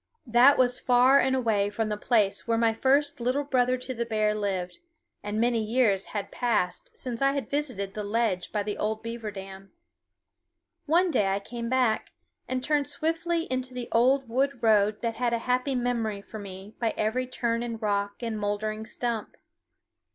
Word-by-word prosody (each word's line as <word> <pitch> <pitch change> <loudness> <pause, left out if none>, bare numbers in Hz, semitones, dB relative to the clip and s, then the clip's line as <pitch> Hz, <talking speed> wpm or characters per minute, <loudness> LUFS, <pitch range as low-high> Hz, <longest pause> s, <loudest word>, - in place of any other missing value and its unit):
That 245 +4 +6
was 250 -1 +3
far 255 +2 +5
away 230 -6 +1
from 215 +1 -2
the 210 - -1
place 210 -2 +1
where 230 -1 +2
my 225 -1 +3
first 275 +5 +2
Little 255 +4 +1
Brother 255 -2 +2
to 255 +1 -5
the 235 -1 -2
Bear 215 -2 +1
lived, 195 - -3 0.4
and 205 +1 -3
many 235 -1 +2
years 215 -4 +2
had 205 -2 -5
passed 220 -7 -1
since 245 -2 -5
I 275 0 +3
had 280 -1 -4
visited 250 -10 -2
the 210 - -4
ledge 205 -3 -1
by 210 -1 -1
the 210 0 -4
old 220 +1 -2
beaver 230 -1 -5
dam. 195 -1 -9 1.2
One 345 +4 +3
day 205 -9 +2
I 195 +1 +1
came 235 +3 -6
back, 250 -4 +1 0.3
and 255 0 -2
turned 295 -1 +1
swiftly 330 +3 -1
into 255 0 -2
the 245 -1 -5
old 260 +3 +3
wood 265 +1 -1
road 210 -1 +3
that 230 -1 -2
had 240 -1 0
a - - +2
happy 250 +2 +1
memory 230 -5 -1
for 220 - -9
me 195 +1 -9
by 230 -2 0
every 245 +4 0
turn 235 -2 -1
and 230 -2 -4
rock 205 0 -1
and 225 -2 -2
moldering 215 +1 -2
stump. 230 -1 -4
230 Hz, 180 wpm, -27 LUFS, 210-255 Hz, 1.2 s, That